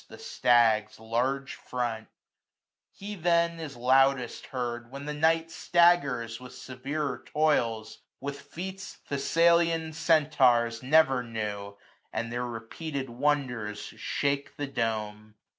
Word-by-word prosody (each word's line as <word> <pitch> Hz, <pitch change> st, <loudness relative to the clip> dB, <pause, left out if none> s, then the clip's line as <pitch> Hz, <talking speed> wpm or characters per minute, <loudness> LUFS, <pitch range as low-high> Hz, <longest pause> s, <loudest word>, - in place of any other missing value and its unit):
The -, -, -12 dB
stag's 115 Hz, -3 st, +2 dB
large 125 Hz, +5 st, -1 dB
front: 120 Hz, -3 st, -4 dB, 0.8 s
he 205 Hz, +1 st, -8 dB
then 170 Hz, -2 st, +1 dB
is 150 Hz, -4 st, -6 dB
loudest 130 Hz, 0 st, +2 dB
heard. 120 Hz, -2 st, -4 dB
When 140 Hz, +2 st, -8 dB
the 150 Hz, -, -3 dB
night 160 Hz, +2 st, +2 dB
staggers 140 Hz, -12 st, +2 dB
with 125 Hz, 0 st, -11 dB
severer 135 Hz, +1 st, -4 dB
toils; 120 Hz, -8 st, 0 dB, 0.2 s
With 140 Hz, +1 st, -5 dB
feats 190 Hz, +7 st, -7 dB
Thessalian 165 Hz, +2 st, +2 dB
Centaurs 130 Hz, -8 st, +3 dB
never 135 Hz, -1 st, +4 dB
knew, 105 Hz, -3 st, -5 dB, 0.3 s
500 -, -, -2 dB
And 115 Hz, +1 st, -4 dB
their 120 Hz, +1 st, -2 dB
repeated 130 Hz, +4 st, -5 dB
wonders 125 Hz, -5 st, -1 dB, 0.2 s
shake 140 Hz, 0 st, -2 dB
the 145 Hz, -, -2 dB
dome. 110 Hz, -4 st, -3 dB
135 Hz, 115 wpm, -28 LUFS, 115-155 Hz, 0.8 s, never